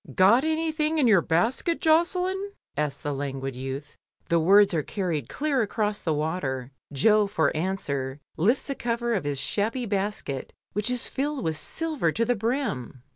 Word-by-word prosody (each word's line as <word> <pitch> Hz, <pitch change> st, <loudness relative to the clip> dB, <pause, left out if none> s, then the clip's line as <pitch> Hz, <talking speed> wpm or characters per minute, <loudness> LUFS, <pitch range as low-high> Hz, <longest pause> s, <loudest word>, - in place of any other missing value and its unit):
"Got 205 Hz, +8 st, +6 dB
anything 315 Hz, 0 st, 0 dB
in 290 Hz, -, +3 dB
your 210 Hz, -7 st, +6 dB
basket, 230 Hz, -, +1 dB
Josselin?" 365 Hz, +5 st, +2 dB, 0.2 s
asks 150 Hz, -2 st, -2 dB
the 145 Hz, -, -1 dB
languid 135 Hz, -1 st, -4 dB
youth; 135 Hz, +3 st, -6 dB, 0.3 s
the 170 Hz, -, +4 dB
words 200 Hz, +4 st, +5 dB
are 160 Hz, -, +2 dB
carried 160 Hz, -, -3 dB
clear 280 Hz, -, 0 dB
across 210 Hz, -1 st, -1 dB
the 165 Hz, -, -1 dB
water. 145 Hz, -5 st, -2 dB, 0.2 s
Jo, 210 Hz, +9 st, +4 dB
for 160 Hz, -8 st, +1 dB
answer, 145 Hz, -6 st, -2 dB, 0.2 s
lifts 225 Hz, -, +2 dB
the 280 Hz, -, -2 dB
cover 235 Hz, -2 st, -1 dB
of 190 Hz, -9 st, -1 dB
his 145 Hz, -2 st, -1 dB
shabby 225 Hz, -, -1 dB
basket, 200 Hz, -, -3 dB, 0.2 s
which 210 Hz, +3 st, 0 dB
is 250 Hz, 0 st, -1 dB
filled 285 Hz, 0 st, -2 dB
with 160 Hz, -1 st, 0 dB
silver 260 Hz, -, -1 dB
to 230 Hz, -, +1 dB
the 245 Hz, -, +2 dB
brim. 215 Hz, -, -2 dB
200 Hz, 165 wpm, -26 LUFS, -, 0.3 s, Got